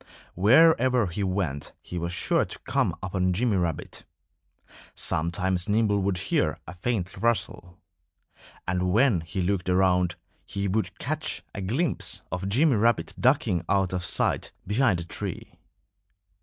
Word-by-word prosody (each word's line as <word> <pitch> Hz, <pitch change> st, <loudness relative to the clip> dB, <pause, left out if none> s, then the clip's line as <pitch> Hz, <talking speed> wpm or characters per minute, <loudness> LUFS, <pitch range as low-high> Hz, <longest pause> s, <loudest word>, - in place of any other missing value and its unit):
Wherever 125 Hz, -, +5 dB
he 95 Hz, +3 st, -3 dB
went 90 Hz, -7 st, -2 dB
he 90 Hz, -, -6 dB
was 85 Hz, +1 st, -3 dB
sure 90 Hz, -, +2 dB
to -, -, -6 dB
come -, -, +1 dB
upon 90 Hz, -1 st, 0 dB
Jimmy 110 Hz, +1 st, +1 dB
Rabbit. 85 Hz, -4 st, -3 dB, 0.9 s
Sometimes 90 Hz, +3 st, -1 dB
Nimble 105 Hz, -1 st, +2 dB
would 95 Hz, -1 st, 0 dB
hear -, -, 0 dB
a 85 Hz, -, -8 dB
faint 95 Hz, 0 st, -2 dB
rustle. 100 Hz, -6 st, -1 dB, 0.9 s
And 90 Hz, 0 st, 0 dB
when 110 Hz, -4 st, +3 dB
he 80 Hz, +3 st, -4 dB
looked 95 Hz, 0 st, -1 dB
around 90 Hz, -1 st, +3 dB, 0.3 s
he 100 Hz, 0 st, -3 dB
would 105 Hz, +3 st, -1 dB
catch -, -, -3 dB
a -, -, -5 dB
glimpse 130 Hz, -, -1 dB
of 90 Hz, +2 st, -3 dB
Jimmy 135 Hz, +4 st, +3 dB
Rabbit 115 Hz, +3 st, +2 dB
ducking 115 Hz, -, +2 dB
out 95 Hz, -2 st, +2 dB
of 90 Hz, -1 st, -2 dB
sight -, -, 0 dB
behind 105 Hz, -2 st, +2 dB
a 85 Hz, -, -6 dB
tree. 85 Hz, -, -5 dB
95 Hz, 140 wpm, -26 LUFS, 90-110 Hz, 0.9 s, Wherever